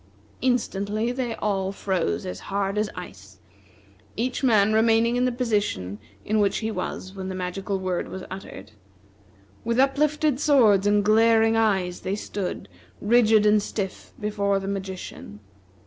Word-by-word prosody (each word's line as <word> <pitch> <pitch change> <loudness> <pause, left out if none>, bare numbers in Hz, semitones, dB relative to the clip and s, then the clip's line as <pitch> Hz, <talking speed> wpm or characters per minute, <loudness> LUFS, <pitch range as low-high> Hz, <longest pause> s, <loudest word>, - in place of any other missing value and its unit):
Instantly, 220 -3 0
they 245 -2 -3
all 195 -2 -1
froze 180 - -2
as 90 0 -5
hard 195 0 -1
as 210 0 0
ice, 100 - -10 0.8
each 250 +4 -2
man 215 -4 +4
remaining 225 +1 +3
in 250 +1 +2
the 255 - +1
position 205 - -1 0.3
in 215 +1 +1
which 200 -1 +2
he 220 0 -2
was 185 -1 -5
when 190 -1 -6
the 190 - -4
magical 185 +2 -3
word 185 -2 -2
was 190 - -7
uttered. 150 - -9 0.9
With 235 +1 -1
uplifted 290 +1 +2
swords 220 -10 +4
and 205 0 +3
glaring 225 +1 +4
eyes 190 -5 +1
they 190 +2 -2
stood, 200 -2 -5 0.3
rigid 220 -1 +4
and 210 0 +5
stiff, 200 -2 -5
before 205 -1 0
the 195 0 -4
magician. 190 - -6
205 Hz, 145 wpm, -24 LUFS, 190-225 Hz, 0.9 s, and